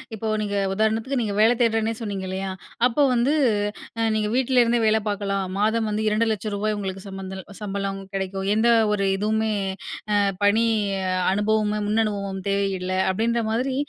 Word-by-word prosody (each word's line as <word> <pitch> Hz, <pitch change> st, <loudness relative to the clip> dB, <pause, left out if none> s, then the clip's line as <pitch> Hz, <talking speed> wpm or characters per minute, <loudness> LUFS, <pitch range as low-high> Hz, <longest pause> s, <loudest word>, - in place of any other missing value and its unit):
இப்ப 220 Hz, +1 st, -3 dB
நீங்க 205 Hz, -1 st, -2 dB, 0.2 s
உதாரணத்துக்கு 220 Hz, +5 st, 0 dB
நீங்க 210 Hz, -2 st, -2 dB
வேலை 225 Hz, +3 st, +5 dB
தேடுறேன்னே 225 Hz, -1 st, +2 dB
சொன்னீங்க 200 Hz, -3 st, -4 dB
இல்லயா! 190 Hz, 0 st, -3 dB, 0.4 s
அப்போ 270 Hz, +4 st, +2 dB
வந்து 245 Hz, +4 st, +2 dB, 0.7 s
அ 225 Hz, -, +2 dB
நீங்க 210 Hz, -1 st, 0 dB
வீட்ல 260 Hz, -1 st, +3 dB
இருந்தே 235 Hz, 0 st, +2 dB
வேலை 220 Hz, 0 st, +3 dB
பார்க்கலாம். 200 Hz, -1 st, -1 dB
மாதம் 220 Hz, +1 st, +1 dB
வந்து 215 Hz, +1 st, -1 dB
ரூ.200000 215 Hz, -1 st, 0 dB
உங்களுக்கு 195 Hz, -1 st, -5 dB
சம்மந்தல் 190 Hz, -1 st, -7 dB, 0.2 s
சம்பளம் 195 Hz, -1 st, -3 dB
கெடைக்கும். 195 Hz, 0 st, -3 dB
எந்த 225 Hz, +2 st, +3 dB, 0.2 s
ஒரு 200 Hz, -1 st, +1 dB
இதுவுமே 220 Hz, +1 st, 0 dB, 0.6 s
அ -, -, +3 dB, 0.3 s
பணி 220 Hz, +3 st, +4 dB, 0.7 s
அனுபவமும், 210 Hz, 0 st, +1 dB
முன்னனுபவமும் 200 Hz, -3 st, -1 dB
தேவையில்ல, 195 Hz, -2 st, -1 dB, 0.2 s
அப்பிடின்ற 230 Hz, +4 st, 0 dB
மாதிரி 255 Hz, +3 st, 0 dB
210 Hz, 145 wpm, -24 LUFS, 195-225 Hz, 0.7 s, வேலை